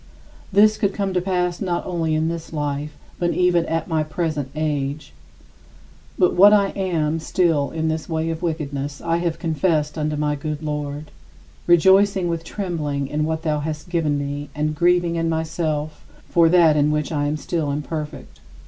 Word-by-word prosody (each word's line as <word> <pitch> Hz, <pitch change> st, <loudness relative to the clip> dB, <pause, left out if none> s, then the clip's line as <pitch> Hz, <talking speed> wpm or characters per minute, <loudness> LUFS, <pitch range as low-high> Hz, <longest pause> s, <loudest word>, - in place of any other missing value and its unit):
This 215 Hz, +2 st, +5 dB
could 200 Hz, -1 st, 0 dB
come 195 Hz, -2 st, -1 dB
to 180 Hz, -, +1 dB
pass 180 Hz, -2 st, -1 dB
not 180 Hz, -3 st, -1 dB
only 165 Hz, -3 st, -1 dB
in 155 Hz, +1 st, +1 dB
this 165 Hz, 0 st, -5 dB
life 145 Hz, -1 st, -3 dB, 0.2 s
but 175 Hz, -1 st, 0 dB
even 180 Hz, -2 st, +2 dB
at 165 Hz, 0 st, -1 dB
my 160 Hz, -3 st, 0 dB
present 155 Hz, -3 st, -2 dB
age. 145 Hz, -, -2 dB, 1.0 s
But 180 Hz, -, +3 dB
what 200 Hz, +3 st, +7 dB
I 200 Hz, -2 st, +4 dB
am 165 Hz, -5 st, -1 dB
still 160 Hz, -3 st, +1 dB
in 160 Hz, 0 st, -2 dB
this 160 Hz, +1 st, -2 dB
way 160 Hz, 0 st, -1 dB
of 165 Hz, 0 st, -5 dB
wickedness 145 Hz, -4 st, -3 dB
I 165 Hz, 0 st, 0 dB
have 170 Hz, -1 st, -1 dB
confessed 160 Hz, -2 st, 0 dB
unto 150 Hz, 0 st, -1 dB
my 150 Hz, 0 st, 0 dB
good 150 Hz, +1 st, -4 dB
Lord, 150 Hz, 0 st, -4 dB, 0.6 s
rejoicing 190 Hz, +2 st, +5 dB
with 165 Hz, -1 st, -2 dB
trembling 150 Hz, -8 st, -3 dB
in 150 Hz, +1 st, -1 dB
what 160 Hz, 0 st, -2 dB
thou 150 Hz, -2 st, 0 dB
hast 150 Hz, +2 st, -5 dB
given 160 Hz, -4 st, 0 dB
me 145 Hz, 0 st, -4 dB
and 155 Hz, +1 st, -1 dB
grieving 175 Hz, +1 st, +2 dB
in 165 Hz, 0 st, 0 dB
myself 155 Hz, -1 st, -2 dB, 0.2 s
for 165 Hz, -1 st, +4 dB
that 165 Hz, -3 st, +5 dB
in 150 Hz, 0 st, +3 dB
which 150 Hz, 0 st, -1 dB
I 145 Hz, -2 st, 0 dB
am 150 Hz, +1 st, -1 dB
still 155 Hz, -1 st, -2 dB
imperfect. 150 Hz, +1 st, -5 dB
160 Hz, 175 wpm, -22 LUFS, 150-175 Hz, 1.0 s, what